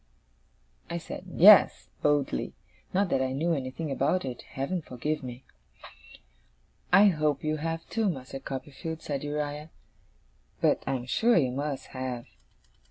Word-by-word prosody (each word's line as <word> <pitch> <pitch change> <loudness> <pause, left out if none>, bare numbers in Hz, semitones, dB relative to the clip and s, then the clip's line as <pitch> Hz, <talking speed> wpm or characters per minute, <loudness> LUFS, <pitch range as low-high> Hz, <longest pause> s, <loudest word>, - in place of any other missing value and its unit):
I 170 - -2
said, 170 +2 -7
'Yes,' 195 +3 +6
boldly; 145 -2 0 0.4
not 195 0 +1
that 130 - +1
I 130 0 -1
knew 165 +5 0
anything 140 +2 -4
about 140 +5 +1
it, 125 -2 -5
Heaven 140 +7 -3
forgive 150 +3 -3
me! 125 0 -8 1.5
'I 195 +3 +8
hope 150 -5 0
you 155 0 0
have, 165 +1 -3
too, 220 -2 0
Master 135 -4 -5
Copperfield,' 145 +4 -6
said 140 -2 -3
Uriah. 150 +1 -3 0.9
'But - - +2
I 135 - +1
am 125 -1 -4
sure 230 - +3
you 130 -6 +2
must 140 +1 -4
have. 130 -2 -5
145 Hz, 140 wpm, -28 LUFS, 135-165 Hz, 1.5 s, I